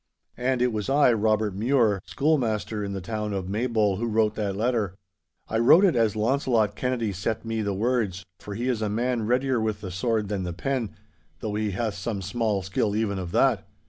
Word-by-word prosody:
'And 125 0 0
it 125 -2 +1
was 105 +2 -3
I, 140 -3 +5
Robert 110 -1 +1
Mure, 110 -3 +2
schoolmaster 115 - 0
in 100 -1 -4
the 95 - -4
town 105 +1 -3
of 95 -2 -3
Maybole, 105 -1 +1
who 120 +3 -2
wrote 110 -1 +2
that 105 -3 -2
letter. 110 -4 0 0.5
I 110 - -1
wrote 160 - +7
it 180 - +3
as 115 -3 +2
Launcelot 110 -2 +1
Kennedy 120 -4 -1
set 105 +5 -3
me 115 -1 -2
the 100 -2 -1
words, 105 -4 -1
for 100 - -7
he 120 +4 -2
is 120 -4 0
a 105 - 0
man 115 +1 -1
readier 125 +1 +1
with 110 -1 -2
the 95 -3 -6
sword 110 +3 0
than 100 -1 -2
the 90 -1 -3
pen, 125 +3 -2 0.4
though 105 - -4
he 105 0 -1
hath 105 +2 -2
some 100 0 -4
small 105 0 -1
skill 105 +2 -1
even 105 -3 0
of 90 -2 -5
that. - - +2
110 Hz, 205 wpm, -26 LUFS, 100-120 Hz, 0.5 s, wrote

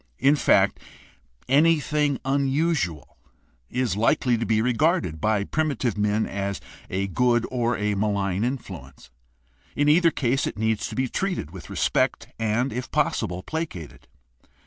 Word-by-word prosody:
In 140 +2 +4
fact, - - +3 0.7
anything 150 0 +3
unusual 135 - 0 0.5
is 125 -5 -1
likely 120 +3 +2
to 115 0 -2
be 110 -1 +2
regarded 125 - +1
by 105 -2 +1
primitive 140 -4 -1
men 105 +1 +1
as 100 0 -3 0.3
a 95 +1 -1
good 120 +4 +1
or 120 -2 0
a 105 0 0
malign 100 -1 0
influence. 85 - -6 0.6
In 145 - +1
either 165 +3 +5
case 135 -3 0
it - - -5
needs 110 0 0
to - - -7
be 130 0 0
treated 180 - -3
with 95 -1 -10
respect - - 0
and, 115 +4 0
if 125 - -4
possible, 90 +1 -1
placated. 150 - -6
120 Hz, 135 wpm, -24 LUFS, 100-140 Hz, 0.7 s, either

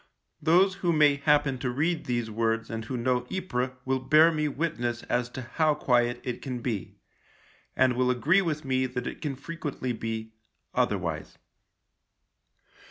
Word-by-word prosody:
Those 180 +5 +4
who 175 - +2
may 150 -3 +4
happen 145 -3 +2
to 125 - -1
read 155 +6 0
these 120 -2 -2
words 115 +1 -1
and 115 0 -4
who 125 +2 -3
know 125 +1 0
Ypres 130 -10 -1 0.2
will 130 0 +1
bear 155 +5 +5
me 155 -1 0
witness 120 -6 -2
as 120 0 -1
to 130 +1 -7
how 155 +5 +1
quiet 120 -3 +2
it 125 -2 -4
can 130 -3 -4
be, 115 -5 -4 0.8
and 130 -1 +4
will 125 0 +2
agree 150 +10 +3
with 155 -5 -2
me 130 -1 +1
that 125 -1 -4
it - - -6
can 145 -3 -2
frequently 140 -3 -4
be 110 -1 -5 0.2
— - - -49
otherwise. - - -1
130 Hz, 165 wpm, -27 LUFS, 120-150 Hz, 0.8 s, bear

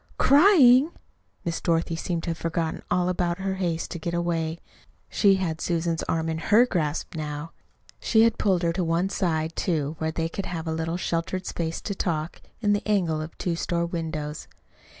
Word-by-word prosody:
"Crying!" 285 -3 +6 0.5
Miss 170 -1 -2
Dorothy 165 -1 +1
seemed 165 0 -3
to 170 - -1
have 165 - -4
forgotten 165 -1 -2
all 180 0 +2
about 175 -1 0
her 190 0 -2
haste 170 -3 -2
to 170 - -5
get 170 +2 -3
away. 165 -2 -1 0.5
She 200 -2 +4
had 165 -4 -2
Susan's 165 -1 0
arm 165 0 0
in 160 0 -2
HER 215 +8 +5
grasp 165 -9 -2
now. 150 +1 -5 0.5
She 220 -1 +4
had 230 0 +2
pulled 185 -4 +2
her 170 0 +1
to 180 +1 -1
one 170 +3 +1
side, 160 -4 -1
too, 155 -5 -1
where 160 - 0
they 165 +1 -1
could 190 +4 -5
have 165 -2 -4
a 160 - -1
little 165 +1 -2
sheltered 180 +1 -2
place 165 -1 -3
to 200 - -3
talk, 165 -4 -3 0.2
in 205 -2 +3
the 205 - +1
angle 175 -7 +1
of 155 +1 -8
two 175 -2 -1
store 170 0 -1
windows. 160 -3 -4
170 Hz, 190 wpm, -25 LUFS, 160-185 Hz, 0.5 s, Crying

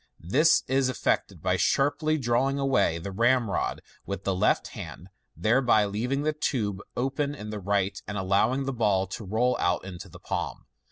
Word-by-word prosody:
This 145 - +4
is 130 0 +2
effected 130 - -1
by - - +2
sharply 150 +3 +2
drawing 130 +1 +1
away 135 -11 +2
the 85 +4 -6
ramrod 115 0 +1 0.2
with 100 -1 -5
the 95 - 0
left 95 - +1
hand, - - -9 0.3
thereby 110 +3 +3
leaving 125 +8 -1
the 155 0 +1
tube 105 -10 -2 0.2
open 140 +3 -1
in 105 -6 -7
the 105 - -4
right, 100 0 -1
and 100 - -4
allowing 100 +8 +1
the 135 - -2
ball 105 -5 +2
to 95 +4 -7
roll 115 +6 +1
out 90 +1 0
into 90 -2 -8
the - - -13
palm. - - -4
115 Hz, 170 wpm, -27 LUFS, 100-135 Hz, 0.3 s, This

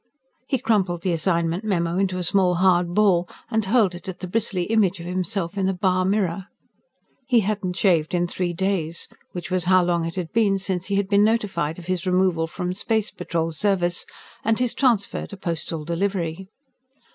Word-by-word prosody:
He 265 - +1
crumpled 195 -8 0
the 185 - +1
assignment 170 +2 0
memo 175 -4 0
into 190 -2 0
a 180 - -2
small, 180 0 +2
hard 175 -1 +3
ball 185 -5 +3 0.2
and 220 -1 +1
hurled 205 -2 +3
it 175 +2 -8
at 185 - -6
the 185 - -5
bristly 200 -2 -1
image 200 -2 +2
of 170 - -8
himself 185 +1 -2
in 190 - +1
the 190 - 0
bar 185 0 +1
mirror. 190 -2 0 0.8
He 245 -4 +4
hadn't 195 -3 -2
shaved 175 -4 +2
in 175 0 +2
three 175 0 -2
days 175 -2 -2 0.3
which 175 0 -6
was 185 -1 0
how 185 0 +5
long 170 -1 +1
it 165 - -5
had 180 -3 -4
been 210 -3 +3
since 190 -1 -2
he 200 - 0
had 200 -1 +1
been 200 0 +4
notified 195 -8 0
of 175 - -10
his 185 0 -2
removal 180 -3 +2
from 180 +2 -3
Space 215 +2 -1
Patrol 170 -3 -2
Service 175 0 0 0.4
and 225 0 +2
his 250 -2 +1
transfer 240 -7 +1
to 200 - -10
Postal 165 -3 -4
Delivery. 180 0 -2
185 Hz, 190 wpm, -23 LUFS, 175-200 Hz, 0.8 s, how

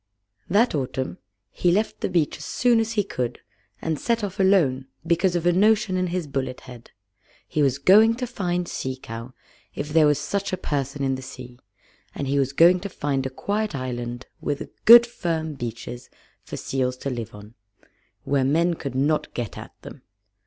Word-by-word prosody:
That 215 +7 +3
autumn 130 - -3 0.3
he 175 - +1
left 210 +5 0
the - - -1
beach 170 -5 0
as 150 - -8
soon 240 -2 +2
as 225 0 -1
he 210 -2 +1
could, 125 -11 -3 0.5
and 160 -2 -1
set 230 -2 0
off 200 -1 -4
alone 160 -10 +3 0.2
because 175 +2 +2
of 175 -1 -1
a 175 - +5
notion 205 0 +3
in 185 0 0
his 175 -1 -2
bullet 135 -2 -4
head. 125 -2 -12 0.6
He 155 - -1
was 135 -2 +2
going 215 +9 +6
to 250 +1 -3
find 180 -7 -2
Sea 130 0 -4
Cow, 115 0 -9 0.4
if 150 - -4
there 155 0 +5
was 150 -1 +3
such 200 +8 -2
a 185 - -1
person 140 -2 -3
in 135 -1 +1
the 130 - -4
sea, 130 -2 -10 0.6
and 140 - -3
he 140 +1 +1
was 135 -1 +1
going 170 +5 +5
to 200 +2 -6
find 140 -6 -2
a - - -5
quiet 205 +7 -2
island 120 -2 -4 0.2
with 145 -1 -3
good 235 +1 +10
firm 165 -9 -3
beaches 120 -1 -7 0.3
for - - -8
seals 125 -1 -2
to 140 - -4
live 115 -3 -5
on, 105 +2 -12 0.7
where 140 -1 +1
men 165 +6 +2
could 140 -5 -6
not 145 +3 +1
get 120 -7 -4
at - - -11
them. - - -10
150 Hz, 190 wpm, -24 LUFS, 130-185 Hz, 0.7 s, good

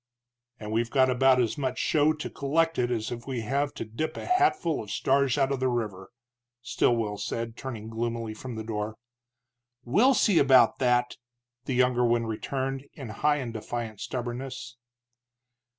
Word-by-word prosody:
"And 105 -1 -6
we've 115 +1 0
got 130 0 +3
about 130 0 +4
as 120 +4 0
much 130 -2 -2
show 155 0 +3
to 155 -1 -4
collect 165 +4 0
it 120 -1 +1
as 115 -3 -2 0.2
we 130 -3 -2
have 140 +5 -1
to - - -5
dip 155 +9 -4
a - - -6
hatful 365 - +2
of 105 - -10
stars 135 +4 +2
out 135 -1 +2
of 135 - -1
the 130 - +1
river," 105 -6 -3 0.5
Stilwell 115 -4 0
said, 115 +2 -4
turning 115 -5 -6
gloomily 115 0 -3
from 120 +2 -7
the 110 - -5
door. 110 0 -4 0.9
"We'll 220 - +4
see 200 -8 +4
about 130 -4 +5
that!" 125 -1 +2 0.5
the 130 - -2
younger 125 -1 +3
one 120 -1 +2
returned, 135 +4 -3
in 135 -6 -8
high 145 +8 +1
and 125 -5 -4
defiant 110 -1 -5
stubbornness. 125 0 -5
125 Hz, 165 wpm, -27 LUFS, 115-135 Hz, 0.9 s, about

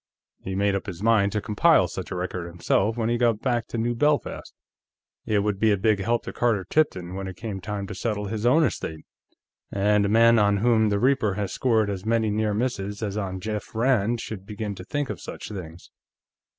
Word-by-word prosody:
He 95 - -5
made 100 +1 +2
up 100 +2 -3
his 95 0 -6
mind 110 -3 +3
to 105 - 0
compile 105 - +4
such 90 +2 -6
a - - -4
record, 90 -1 -4
himself, 90 +6 0
when 115 -2 0
he 120 0 0
got 115 -3 +2
back 120 -2 -1
to - - -5
New 120 +1 0
Belfast. 150 +4 0 0.8
It 105 -2 +2
would 105 -2 -1
be 110 0 +4
a 100 - +2
big 105 +1 +2
help 115 +5 0
to - - -7
Carter 110 -6 +1
Tipton, 95 - 0
when 95 0 -4
it 95 - -7
came 105 -4 -5
time 100 +1 -4
to 105 - -7
settle 105 0 -2
his 105 +1 -4
own 150 +7 +5
estate, 80 - -3 0.7
and 105 +1 +2
a 100 - +1
man 115 +1 +5
on 100 -1 +3
whom 110 0 +3
the 100 - +1
Reaper 125 -6 +2
has 100 -2 -3
scored 110 -4 +2
as 95 -2 -5
many 110 -1 +1
near 105 0 0
misses 105 -3 -2
as 100 -2 -3
on 95 -3 -3
Jeff 105 +2 -5
Rand 115 -1 +2
should 100 -4 -7
begin 105 +1 -5
to 90 - -9
think 145 +6 -2
of - - -7
such - - -8
things. 90 -4 -9
105 Hz, 215 wpm, -25 LUFS, 95-115 Hz, 0.8 s, own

